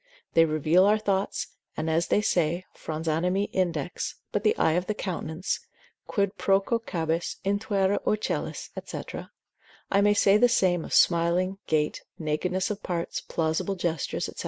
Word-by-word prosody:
They 165 - +6
reveal 155 +4 +3
our 210 +1 +5
thoughts, 200 -2 -1 0.3
and 160 - -2
as 165 +1 +1
they 210 - +3
say, 175 -1 +1
frons 160 +1 -5
animi 180 +5 +1
index, 175 -3 -1 0.2
but 205 - 0
the 215 - +3
eye 160 - +3
of 175 +3 0
the 215 - -1
countenance, 180 -2 -3 0.5
Quid 200 0 0
procacibus 195 -5 0
intuere 200 -1 +1
ocellis? 215 0 -2
&c. - - -6 0.7
I 200 - +4
may 205 0 +4
say 200 0 +5
the 245 +3 +5
same 180 -7 +2
of - - -2
smiling, 180 +3 +3
gait, 150 -1 0 0.2
nakedness 180 +5 -1
of 210 0 -5
parts, 170 -2 -3
plausible 165 +5 -1
gestures, 170 -4 -2
&c. - - -5
180 Hz, 150 wpm, -27 LUFS, 165-200 Hz, 0.7 s, They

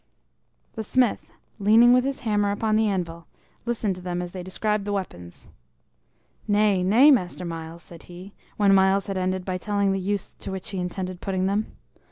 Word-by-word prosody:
The 220 - -5
smith, 250 +1 0 0.3
leaning 225 +4 +6
with 250 0 +3
his 275 0 -3
hammer 210 -3 +1
upon 215 +1 0
the 220 0 +3
anvil, 170 -4 -3 0.4
listened 225 -4 -1
to - - -10
them 180 -1 -3
as 175 0 -5
they 185 - -6
described 210 +3 -2
the 205 - -4
weapons. 90 - -6 1.0
"Nay, 205 -2 +3
nay, 230 +11 +6
Master 180 -7 0
Myles," 165 0 -7
said 170 -2 -13
he, 180 +3 -11 0.2
when 200 -2 +4
Myles 195 0 +3
had 195 - -4
ended 185 0 -2
by 185 -1 -3
telling 200 0 0
the 195 - -1
use 200 +1 -2
to - - -6
which 190 -1 -6
he 195 - -4
intended 180 0 -5
putting 190 -2 -1
them. 205 +3 -1
195 Hz, 185 wpm, -24 LUFS, 180-210 Hz, 1.0 s, leaning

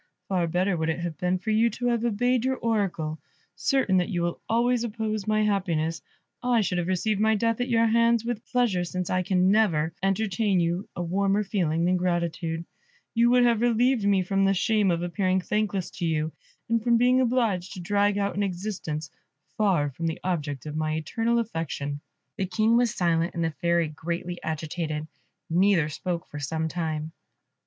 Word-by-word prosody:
Far 180 -3 +1
better 180 +3 +1
would 160 -1 -1
it 160 - 0
have 170 -2 -3
been 180 +1 +1
for 190 +4 -3
you 225 +2 +4
to 245 +3 -2
have 235 -1 0
obeyed 240 +2 +1
your 260 0 +1
Oracle. 185 -9 -1 0.4
Certain 260 -9 +2
that 180 - +1
you 175 -4 -1
will 170 0 -2
always 240 +1 +2
oppose 215 -2 -3
my 215 0 +2
happiness, 170 -6 0 0.4
I 245 -2 +2
should 180 -3 0
have 175 - -2
received 195 +3 0
my 220 0 +4
death 230 +2 0
at 245 - -1
your 230 -1 +3
hands 230 0 +3
with 240 -1 -3
pleasure, 235 -8 +1
since 180 0 -3
I 185 - +2
can 185 +1 +2
never 165 -8 +2
entertain 195 +1 +1
for - - +3
you 175 +4 -2
a 175 - -2
warmer 195 +4 +1
feeling 170 -5 0
than 180 +1 +2
gratitude. 170 -2 -1 0.5
You 235 0 +4
would 245 0 +5
have 235 -2 +3
relieved 240 0 +2
me 200 -2 +3
from 195 +1 +1
the 195 0 +3
shame 210 +1 +2
of 170 -1 0
appearing 185 +1 +1
thankless 200 -1 -1
to 175 - -4
you, 155 0 0 0.4
and 230 -1 +1
from 235 -1 +4
being 250 +2 +4
obliged 230 -8 0
to - - -8
drag 205 +3 +1
out 200 0 -1
an 205 - -1
existence 180 -6 -3 0.4
far 180 -9 +2
from 165 +5 -3
the 160 - -3
object 150 -7 -2
of 150 0 -5
my 155 0 -1
eternal 225 +9 0
affection." 165 -9 -3 0.4
The 190 -3 -1
King 215 +5 +2
was 240 -2 +2
silent, 170 -1 +1
and 170 - -1
the 165 - 0
Fairy 170 +1 +1
greatly 170 +3 -5
agitated; 155 0 -3 0.4
neither 175 -2 +3
spoke 170 +2 -4
for 150 - -8
some 160 +3 -2
time. 160 -2 -3
190 Hz, 190 wpm, -26 LUFS, 170-220 Hz, 0.5 s, would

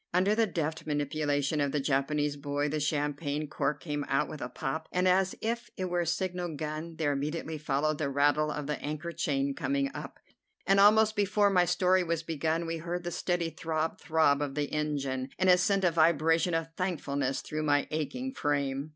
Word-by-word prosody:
Under 190 +3 +4
the 225 0 +2
deft 160 -3 -3
manipulation 145 0 0
of 140 -1 +1
the 150 - 0
Japanese 145 +2 0
boy, 145 0 -2
the 155 +1 -1
champagne 145 0 -1
cork 150 0 -1
came 145 -3 -3
out 135 +2 +1
with 150 - -8
a 125 - -4
pop, 135 +5 -4
and, 180 +1 +1
as 190 +1 +3
if 235 +1 -2
it 185 -1 -3
were 175 - +1
a 170 - -1
signal 180 -1 -2
gun, 155 +2 -5
there 155 -2 0
immediately 155 +2 -3
followed 150 +1 0
the 145 -3 0
rattle 145 +2 +2
of 150 -1 -4
the 150 0 -3
anchor 155 +3 -4
chain 140 -4 -1
coming 275 - -1
up, - - -7 0.5
and 195 0 +4
almost 215 +2 +6
before 205 0 +3
my 180 -2 +4
story 180 +1 +3
was 165 -1 -1
begun, 160 +1 -1
we 165 0 -3
heard 175 +2 -4
the 175 - -3
steady 175 -1 -1
throb 160 0 -2
throb 155 -4 +3
of 140 -2 -3
the 145 -1 -2
engine, 140 -4 -2
and 185 0 +4
it 180 - +6
sent 195 +1 +2
a 175 - +4
vibration 165 +1 +3
of 165 0 -2
thankfulness 145 -7 -1
through 155 0 -3
my 145 -2 +2
aching 250 - -3
frame. 140 - -1
155 Hz, 195 wpm, -30 LUFS, 145-175 Hz, 0.5 s, almost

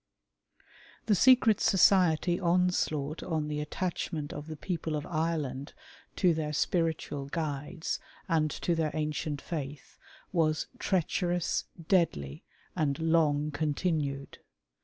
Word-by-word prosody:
The 215 - +3
secret 230 +1 +5
society 180 -3 +4
onslaught 170 -4 +1
on 160 -4 -2
the 150 0 -2
attachment 155 -2 -3
of 145 - -7
the 160 - -5
people 165 -1 -3
of 150 - -3
Ireland 155 -5 -2 0.4
to 180 -3 +4
their 155 -1 -2
spiritual 160 -3 0
guides 155 +2 -3 0.3
and 160 -4 +2
to 170 - -1
their 160 -2 +1
ancient 150 -1 -2
faith 145 -4 -6 0.3
was 160 -3 +1
treacherous, 175 -1 0 0.2
deadly, 75 - +1 0.3
and 140 -3 0
long 155 -2 +2
continued. 145 -2 -2
160 Hz, 110 wpm, -30 LUFS, 150-175 Hz, 0.4 s, secret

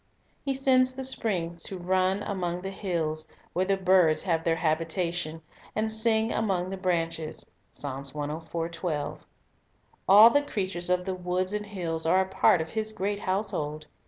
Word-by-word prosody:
He 275 -1 -1
sends 255 -1 +3
the 265 - -4
springs 180 -10 -1
to 190 - -4
run 185 +2 +1
among 180 -3 -3
the 195 - -3
hills, 160 -5 -2 0.3
where 185 +2 +1
the 195 0 +1
birds 180 -4 +4
have 165 -4 0
their 165 -1 +2
habitation, 165 0 -1 0.3
and 220 +1 0
"sing 220 0 +2
among 190 -4 0
the - - -2
branches." 165 -4 -2 0.3
1 150 +3 -4 0.9
All 210 +4 +10
the 285 - +4
creatures 185 -9 -3
of 180 0 +1
the 190 - -2
woods 185 +1 -2
and 210 0 -3
hills 165 -5 -2
are 185 +3 +4
a 190 - -1
part 185 -2 +3
of 160 - -6
His 220 0 -1
great 200 +1 -2
household. 170 -7 -1
180 Hz, 155 wpm, -27 LUFS, 165-205 Hz, 0.9 s, All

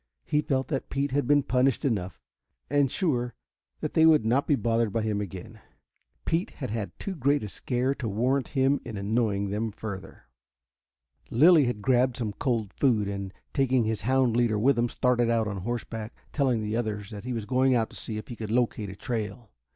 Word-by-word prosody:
He 150 -1 +1
felt 135 -3 -1
that 135 -4 -3
Pete 140 0 -1
had 140 -2 0
been 145 0 +4
punished 130 0 +1
enough, 95 -8 -1 0.5
and 145 -1 +4
was 135 - -4
sure 125 - -1 0.5
that - - -3
they 160 0 +6
would 155 -8 +5
not 125 +5 +2
be 145 - +4
bothered 115 -3 +1
by 115 +1 -1
him 105 -2 -1
again. 95 -2 -8 0.6
Pete 175 +7 0
had 130 -7 -6
had 110 -3 -4
too 195 - -4
great 140 -3 +1
a - - -3
scare 125 +6 -1
to 125 -5 -4
warrant 125 +6 +1
him 135 +2 +3
in 110 - -6
annoying 100 -1 0
them 110 +2 -1
further. 100 -2 -8 1.1
Lilly 155 +4 +6
had 120 -4 -3
grabbed 125 0 +3
some 110 -4 -2
cold 115 -3 -1
food, 115 -7 +2
and, 100 -1 -4 0.2
taking 130 -3 +2
his 110 -1 -1
hound 130 +1 +2
leader 120 -3 +2
with 130 +6 +3
him, 120 +1 +1
started 120 -1 +1
out 115 -2 +2
on 100 -1 -3
horseback, 115 +2 -4 0.2
telling 130 -6 +1
the 105 +1 -2
others 105 -3 -3
that 105 -2 -7
he 125 - -4
was 115 -4 -3
going 130 +3 +3
out 115 -2 0
to - - -11
see 110 - -4
if 110 - -7
he 120 - -6
could 110 -2 -6
locate 115 -3 0
a 95 - -8
trail. 110 0 -4
120 Hz, 205 wpm, -27 LUFS, 105-130 Hz, 1.1 s, they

